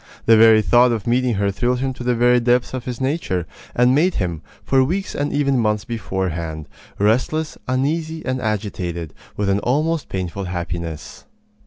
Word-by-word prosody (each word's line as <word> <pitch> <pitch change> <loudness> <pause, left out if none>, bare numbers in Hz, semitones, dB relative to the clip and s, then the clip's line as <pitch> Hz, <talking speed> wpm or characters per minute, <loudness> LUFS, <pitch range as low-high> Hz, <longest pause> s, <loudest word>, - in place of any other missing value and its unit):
The 115 - +6
very 110 -1 +6
thought 120 +3 +5
of 110 -5 -2
meeting 125 0 +1
her 100 0 0
thrilled 125 +5 0
him 130 +1 -2
to 125 - -8
the 125 0 +1
very 125 +1 +4
depths 120 +1 +1
of 130 -2 -4
his 125 -2 -5
nature, 130 - -1 0.3
and 125 +1 +4
made 170 +6 +2
him, 85 -5 -2 0.2
for 135 -1 +3
weeks 190 +8 -2
and 145 0 -2
even 140 -2 +1
months 105 -1 0
beforehand, 90 -8 -4 0.3
restless, 130 +9 +1
uneasy, 155 +5 -1
and 130 0 -2
agitated, 95 - -3 0.2
with 105 - 0
an 100 +1 +2
almost 155 +7 0
painful 95 +1 -4
happiness. 85 -4 -5
120 Hz, 170 wpm, -20 LUFS, 95-130 Hz, 0.3 s, The